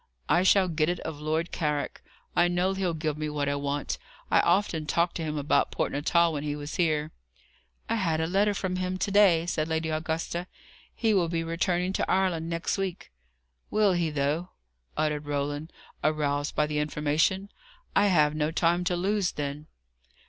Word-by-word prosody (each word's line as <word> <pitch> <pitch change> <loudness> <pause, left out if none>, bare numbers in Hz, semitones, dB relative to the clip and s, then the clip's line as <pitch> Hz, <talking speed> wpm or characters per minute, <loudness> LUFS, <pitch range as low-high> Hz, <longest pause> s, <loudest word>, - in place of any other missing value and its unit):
"I 175 - +4
shall 190 0 +5
get 160 -2 +1
it 175 -1 -1
of 160 -2 -6
Lord 160 +3 -1
Carrick. 150 -3 -2 0.3
I 175 - +5
know 180 +2 +1
he'll 185 -3 -1
give 155 -1 -2
me 155 0 -2
what 145 -1 -2
I 140 - +1
want. 145 0 -2 0.3
I - - +6
often 165 -6 +1
talked 170 +2 +1
to 165 - -3
him 155 -1 -3
about 145 0 +2
Port - - -1
Natal 165 +3 +2
when 145 - -2
he 145 0 -2
was 145 0 -6
here." 155 -3 +1 0.8
"I 230 - 0
had 165 -6 0
a 160 - +1
letter 200 +4 +2
from 185 -2 -2
him 185 0 -2
to 200 - -1
day," 190 -5 +5
said 155 -3 -1
Lady 160 0 -1
Augusta. 165 +2 -2 0.5
"He 225 -2 +2
will 175 -4 +2
be 165 -1 -1
returning 175 +2 0
to - - 0
Ireland 180 -4 +1
next 170 +3 -1
week." 190 -2 -4 0.6
"Will 210 -3 +3
he, 170 -2 +1
though?" 150 +4 -1 0.5
uttered 150 -1 -1
Roland, 145 +2 -2 0.3
aroused 145 -1 0
by 150 - +3
the 150 0 -2
information. 155 +7 0 0.4
"I 205 - +5
have 150 -6 +4
no 155 0 0
time 170 +2 +2
to 180 -1 +1
lose, 195 +1 0
then." 145 +1 -4
165 Hz, 185 wpm, -28 LUFS, 150-180 Hz, 0.8 s, I